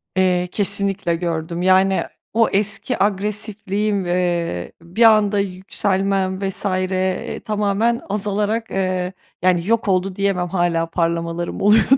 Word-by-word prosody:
Eee, 180 -1 +2
kesinlikle 200 -3 0
gördüm. 170 0 -3
Yani, 190 +1 +4 0.3
o 230 +1 +3
eski 215 +4 0
agresifliğim, 205 0 -1
eee, 175 - -1
bir 175 +8 0
anda 215 -2 +5
yükselmem 190 0 -1
vs. 195 - -4
eee, 185 -1 -1
tamamen 210 +2 0
azalarak, 210 +2 -1
eee, 185 -1 -1 0.3
yani, 180 -1 +2
yok 230 -1 +1
oldu 185 0 +1
diyemem 195 -2 0
hâlâ 175 -2 +1
parlamalarım 170 0 -2
oluyor 210 +2 +5
190 Hz, 115 wpm, -20 LUFS, 180-205 Hz, 0.3 s, anda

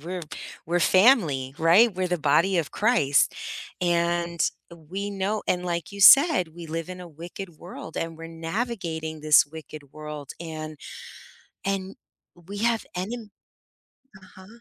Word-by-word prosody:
we're 175 +3 -5 0.4
we're 175 +2 0
family, 170 - +4
right, 185 +8 +5
we're 185 0 -1
the 180 -1 -1
body 165 +6 +3
of 155 - -1
Christ 205 - +2 0.5
and 170 -1 0 0.3
we 180 +5 -6
know 200 +2 -2
and 180 0 0
like 170 -1 -3
you 200 0 -8
said, 275 - +7
we 170 -1 -9
live 165 +1 -4
in 185 0 -7
a 175 - -9
wicked 170 +2 -9
world 170 -2 -10
and 165 -1 -3
we're 165 0 -9
navigating 165 -3 -4
this 155 0 +6
wicked 150 -2 -11
world 150 -2 -8
and 155 -2 -7 0.9
and 195 -1 -2 0.5
we 200 +2 -7
have 230 +1 +1
enem 215 +4 -5 0.9
Uh-huh. 185 0 -15
170 Hz, 140 wpm, -25 LUFS, 160-195 Hz, 0.9 s, said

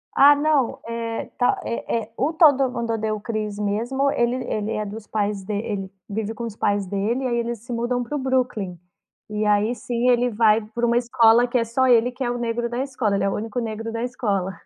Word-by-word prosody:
Ah, 290 +1 +8
não! 290 -4 +1
Eh, 230 -1 -3
tá, 245 - +2
é 235 0 -2
é 220 - -14
o 295 +5 0
Todo 285 -5 +5
Mundo 230 -2 -2
Odeia 220 -1 -1
o - - -6
Chris 215 -2 -4
mesmo, 235 +7 0
ele 240 +1 +1
ele 215 +1 -2
é 215 0 -2
dos 210 +1 -8
pais 205 -2 -1
de 210 - -4
ele 200 -2 -3 0.2
vive 220 +2 -3
com 235 - -6
os 225 -3 -5
pais 205 -2 0
dele, 210 +7 -1
aí 240 - 0
eles 235 -1 -2
se 245 - -5
mudam 245 +1 -1
para 270 +5 -5
o - - -1
Brooklyn. 250 -9 -1 0.5
E 210 0 -2
aí 210 +3 +2
sim, 245 0 -1
ele 245 0 +3
vai 220 -1 +3
pra 225 +3 -3
uma 235 0 +2
escola 235 0 +4
que 245 +1 0
é 230 - +2
só 235 +3 +1
ele 245 0 +4
que 255 +2 -5
é 240 - 0
o 245 - -2
negro 235 0 -2
da 240 +1 -3
escola, 245 -7 -1
ele - - 0
é 195 - +2
o - - -2
único 225 +3 -3
negro 225 0 -4
da 230 +1 -3
escola. 205 -7 -1
230 Hz, 235 wpm, -23 LUFS, 210-245 Hz, 0.5 s, Ah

